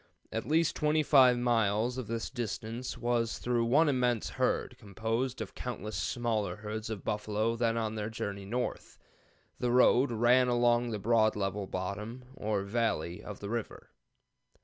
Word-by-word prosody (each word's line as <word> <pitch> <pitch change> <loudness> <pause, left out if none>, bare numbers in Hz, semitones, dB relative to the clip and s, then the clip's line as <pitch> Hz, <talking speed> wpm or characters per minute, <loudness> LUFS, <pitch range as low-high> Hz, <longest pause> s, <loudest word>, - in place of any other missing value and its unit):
At 115 - -3
least 160 +1 +2
25 150 -5 +5
miles 120 0 +1
of 125 - -5
this 115 +1 -3
distance 120 0 -4
was 120 -1 0
through 120 -1 0
one 145 +7 +4
immense 125 -5 +1
herd, - - -1
composed 115 +5 -2
of - - -6
countless 110 -3 -5
smaller 110 -7 -1
herds 110 +2 -5
of 110 -4 -5
buffalo 105 +2 -1
then 115 -1 +1
on 110 -1 -1
their 105 -1 -3
journey 100 -3 -5
north. 120 +5 -4 0.6
The 125 - 0
road 125 +1 +5
ran 120 +3 +4
along 120 0 +3
the 110 - -2
broad 110 +1 +3
level 100 0 -2
'bottom,' 105 +7 -5
or 105 -6 -2
valley, 100 -6 -1
of 105 -2 -8
the 100 - -5
river. 115 -2 -5
115 Hz, 150 wpm, -31 LUFS, 105-125 Hz, 0.6 s, 25